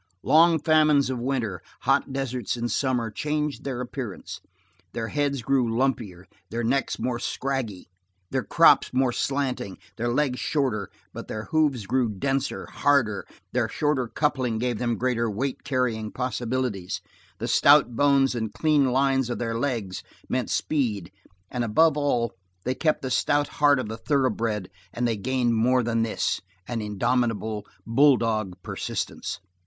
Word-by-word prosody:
Long 165 Hz, +4 st, +5 dB
famines 150 Hz, -3 st, +4 dB
of 125 Hz, -, -3 dB
winter, 120 Hz, -5 st, -2 dB, 0.2 s
hot -, -, +2 dB
deserts 130 Hz, -4 st, -2 dB
in 120 Hz, 0 st, -2 dB
summer, 125 Hz, -5 st, 0 dB
changed 150 Hz, +5 st, -2 dB
their 130 Hz, -3 st, -3 dB
appearance. 120 Hz, -4 st, -6 dB, 0.5 s
Their 115 Hz, -1 st, -3 dB
heads 140 Hz, -3 st, -1 dB
grew 130 Hz, -2 st, +2 dB
lumpier, 115 Hz, -7 st, -1 dB, 0.2 s
their 120 Hz, +1 st, -3 dB
necks 135 Hz, +4 st, 0 dB
more 125 Hz, -2 st, -2 dB
scraggy, 130 Hz, -7 st, -3 dB, 0.4 s
their -, -, +1 dB
croups -, -, +5 dB
more 130 Hz, -1 st, +2 dB
slanting, 130 Hz, -7 st, -2 dB, 0.2 s
their 120 Hz, -, -1 dB
legs 130 Hz, -1 st, +1 dB
shorter; 125 Hz, -, -1 dB, 0.2 s
but -, -, -7 dB
their 110 Hz, -, -4 dB
hoofs 150 Hz, -9 st, +2 dB
grew 125 Hz, +2 st, +1 dB
denser, 135 Hz, +7 st, -2 dB
hardier, 130 Hz, -8 st, +1 dB, 0.3 s
their -, -, 0 dB
shorter 145 Hz, -5 st, 0 dB
coupling 130 Hz, -4 st, 0 dB
gave 120 Hz, -1 st, -1 dB
them 120 Hz, -2 st, 0 dB
greater 120 Hz, -1 st, 0 dB
weight 130 Hz, +6 st, -3 dB
carrying 120 Hz, -5 st, -1 dB
possibilities, 125 Hz, -5 st, -2 dB, 0.4 s
the -, -, -4 dB
stout 140 Hz, -4 st, +5 dB
bones 140 Hz, 0 st, +4 dB
and 115 Hz, -2 st, -2 dB
the -, -, -18 dB
clean 150 Hz, -3 st, +3 dB
lines 135 Hz, -1 st, +2 dB
of 120 Hz, -, -2 dB
their 115 Hz, -1 st, -2 dB
legs 115 Hz, -8 st, -2 dB, 0.3 s
meant 125 Hz, -7 st, -1 dB
speed, 100 Hz, -, -1 dB, 0.4 s
and 125 Hz, -1 st, -1 dB
above 155 Hz, +8 st, +4 dB
all 125 Hz, -7 st, 0 dB, 0.3 s
they 130 Hz, -, 0 dB
kept 155 Hz, +2 st, 0 dB
the 130 Hz, -, -3 dB
stout 145 Hz, +3 st, +2 dB
heart 145 Hz, -1 st, +6 dB
of 130 Hz, -, -3 dB
the 110 Hz, +1 st, -5 dB
thoroughbred 115 Hz, -7 st, 0 dB, 0.2 s
and 120 Hz, 0 st, -1 dB
they 115 Hz, -, 0 dB
gained 120 Hz, +2 st, 0 dB
more 125 Hz, +3 st, +3 dB
than 115 Hz, 0 st, 0 dB
this, 110 Hz, -2 st, -1 dB, 0.3 s
an 120 Hz, -2 st, -3 dB
indomitable, 110 Hz, 0 st, -1 dB, 0.2 s
bulldog 115 Hz, -6 st, +3 dB
persistence. -, -, -4 dB
125 Hz, 150 wpm, -25 LUFS, 115-140 Hz, 0.5 s, heart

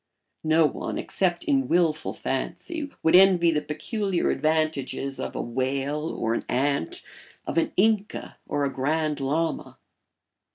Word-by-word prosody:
No 160 Hz, +1 st, +4 dB
one, -, -, -2 dB
except 175 Hz, -3 st, -1 dB
in 275 Hz, -2 st, +1 dB
wilful 165 Hz, -3 st, +2 dB
fancy, 315 Hz, -5 st, -4 dB
would 160 Hz, +2 st, +5 dB
envy 180 Hz, -3 st, +6 dB
the 150 Hz, -2 st, 0 dB
peculiar 185 Hz, +6 st, -1 dB
advantages 155 Hz, -3 st, -1 dB
of -, -, -4 dB
a -, -, -1 dB
whale 135 Hz, +5 st, -1 dB
or 115 Hz, -, 0 dB
an -, -, -2 dB
ant, 140 Hz, -6 st, 0 dB, 0.4 s
of 165 Hz, -, +1 dB
an -, -, 0 dB
Inca 210 Hz, 0 st, +1 dB
or 145 Hz, -, -1 dB
a 135 Hz, -, -2 dB
Grand 150 Hz, +2 st, 0 dB
Lama. 155 Hz, +5 st, -1 dB
155 Hz, 135 wpm, -26 LUFS, 140-180 Hz, 0.4 s, envy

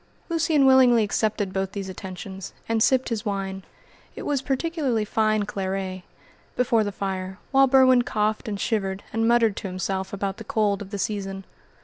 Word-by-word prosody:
Lucian 320 Hz, -4 st, +2 dB
willingly 255 Hz, -3 st, +6 dB
accepted 205 Hz, -1 st, -1 dB
both 190 Hz, 0 st, -2 dB
these 195 Hz, -2 st, -4 dB
attentions, 190 Hz, 0 st, -8 dB
and 225 Hz, -1 st, 0 dB
sipped 260 Hz, +2 st, +3 dB
his 225 Hz, -3 st, -2 dB
wine 195 Hz, -2 st, -3 dB, 0.5 s
it -, -, -7 dB
was 285 Hz, -3 st, 0 dB
particularly 270 Hz, -5 st, -1 dB
fine 215 Hz, 0 st, +1 dB
claret 190 Hz, -1 st, -3 dB, 0.5 s
before 235 Hz, -3 st, +2 dB
the 205 Hz, -, -3 dB
fire, 190 Hz, -1 st, -4 dB
while 270 Hz, 0 st, +5 dB
Berwin 260 Hz, -1 st, +6 dB
coughed 215 Hz, 0 st, -1 dB
and 205 Hz, -2 st, -3 dB
shivered, 195 Hz, -4 st, -1 dB
and 225 Hz, 0 st, +1 dB
muttered 230 Hz, -3 st, +3 dB
to -, -, -4 dB
himself 190 Hz, +1 st, -3 dB
about 200 Hz, -1 st, -3 dB
the -, -, -8 dB
cold 215 Hz, -7 st, 0 dB
of 200 Hz, -, -7 dB
the 205 Hz, -, -4 dB
season. 195 Hz, -1 st, -3 dB
210 Hz, 165 wpm, -24 LUFS, 195-245 Hz, 0.5 s, willingly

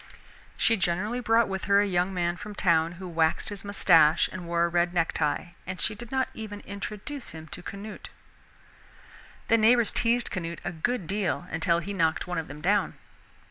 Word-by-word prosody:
She 225 Hz, -, +3 dB
generally 190 Hz, +7 st, -1 dB
brought 230 Hz, -1 st, +3 dB
with 190 Hz, -1 st, -4 dB
her 200 Hz, 0 st, +5 dB
a 205 Hz, -, +3 dB
young 180 Hz, -1 st, +1 dB
man 175 Hz, -2 st, -1 dB
from 210 Hz, +3 st, -8 dB
town 165 Hz, -3 st, +2 dB
who 185 Hz, +1 st, -8 dB
waxed 165 Hz, +1 st, +1 dB
his 205 Hz, -1 st, -5 dB
mustache 165 Hz, -6 st, +4 dB
and 180 Hz, -2 st, -7 dB
wore 170 Hz, 0 st, +2 dB
a -, -, +1 dB
red 175 Hz, +1 st, 0 dB
necktie, 165 Hz, 0 st, 0 dB, 0.2 s
and 185 Hz, 0 st, -5 dB
she 215 Hz, -, 0 dB
did 235 Hz, +2 st, -10 dB
not 265 Hz, -1 st, +1 dB
even 205 Hz, -2 st, -7 dB
introduce 210 Hz, -, -6 dB
him 160 Hz, -1 st, -9 dB
to -, -, -6 dB
Canute. 200 Hz, +4 st, -8 dB, 1.4 s
The 230 Hz, -, +4 dB
neighbors 230 Hz, +1 st, +4 dB
teased 240 Hz, +1 st, +1 dB
Canute 170 Hz, -2 st, -4 dB
a 175 Hz, -, -1 dB
good 185 Hz, +5 st, -2 dB
deal 190 Hz, -1 st, -1 dB
until 165 Hz, +1 st, +2 dB
he 195 Hz, +4 st, -4 dB
knocked 165 Hz, -4 st, +1 dB
one 180 Hz, -1 st, -2 dB
of 160 Hz, -, -5 dB
them 145 Hz, +2 st, -9 dB
down. 205 Hz, +5 st, +1 dB
185 Hz, 185 wpm, -27 LUFS, 170-210 Hz, 1.4 s, her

